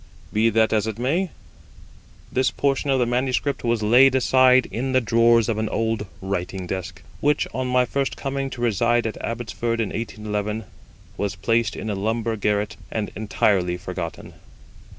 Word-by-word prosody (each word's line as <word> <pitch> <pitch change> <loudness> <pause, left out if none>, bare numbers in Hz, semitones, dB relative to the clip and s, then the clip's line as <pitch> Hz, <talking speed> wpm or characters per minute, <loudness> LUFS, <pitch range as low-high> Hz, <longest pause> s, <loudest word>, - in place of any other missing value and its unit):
Be 110 +2 +3
that 110 0 +2
as 110 -1 +1
it 110 -1 -4
may, 160 +10 0 1.0
this 130 +1 +2
portion 140 0 0
of 135 - +3
the 125 - +2
manuscript 130 +3 -1
was 115 -2 0
laid 130 +5 +6
aside 130 0 +5
in 130 +3 -2
the 130 - +5
drawers 115 -1 +4
of 110 -2 -1
an 110 - -1
old 110 -2 -1 0.2
writing 95 -1 -3
desk, 90 0 -5 0.2
which, 145 0 +2
on 130 0 -2
my 125 0 +3
first 140 +1 -2
coming 135 0 -3
to 125 - -8
reside 120 +1 +2
at 110 - -4
Abbotsford 115 0 -2
in 110 - 0
1811, 105 -1 -3 0.5
was 100 -1 -2
placed 115 -1 +1
in 110 - -4
a - - -1
lumber 110 +3 -1
garret 105 0 -1
and 105 -2 -3
entirely 95 -4 +1
forgotten. - - -6
115 Hz, 165 wpm, -23 LUFS, 105-125 Hz, 1.0 s, laid